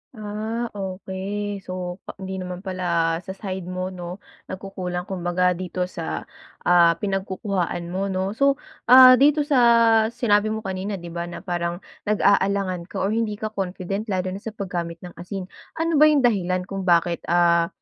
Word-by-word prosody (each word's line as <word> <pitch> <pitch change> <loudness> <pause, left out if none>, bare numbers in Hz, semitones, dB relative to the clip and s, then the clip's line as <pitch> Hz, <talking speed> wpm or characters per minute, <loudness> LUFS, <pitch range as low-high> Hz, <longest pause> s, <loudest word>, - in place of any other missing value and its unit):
Ah, 220 +3 -4
okey. 195 +1 -4
So, 180 0 -5
pa - - -7
hindi 190 0 -6
naman 180 +1 -6
pala 170 -3 0
sa 190 - -5
side 190 -3 -5
mo 185 +1 -3
'no, 180 +1 -8 0.2
nagkukulang. 185 -2 -5
Kumbaga 180 -1 0
dito 180 0 -3
sa, 170 -2 -4 0.4
ah, 170 -1 +5
pinagkukuhaan 190 -2 -2
mo 195 +2 -1
'no. 190 +1 -1
So, 275 +5 +3 0.3
ah, 255 0 +9
dito 295 +1 +4
sa 285 -3 +2 0.5
sinabi 220 -3 +2
mo 220 0 -3
kanina, 190 +2 -3
'di 175 -2 -8
ba 170 0 -4
na 175 - -8
parang 175 -1 -3 0.2
nag-aalangan 200 -3 +2
ka 195 - -4
or 200 - +1
hindi 220 -2 0
ka 215 +1 -5
confident 195 +1 -4
lalo 185 -2 -1
na 195 - -5
sa 220 +1 -8
paggamit 175 -4 -4
ng 175 - -8
asin. 185 +2 -5 0.3
Ano 325 -2 +1
ba 305 - +8
yung 295 -4 +3
dahilan 185 -6 +1
kung 195 0 -5
bakit, 170 0 +3
ah, 170 -1 +4
190 Hz, 165 wpm, -23 LUFS, 180-205 Hz, 0.5 s, ah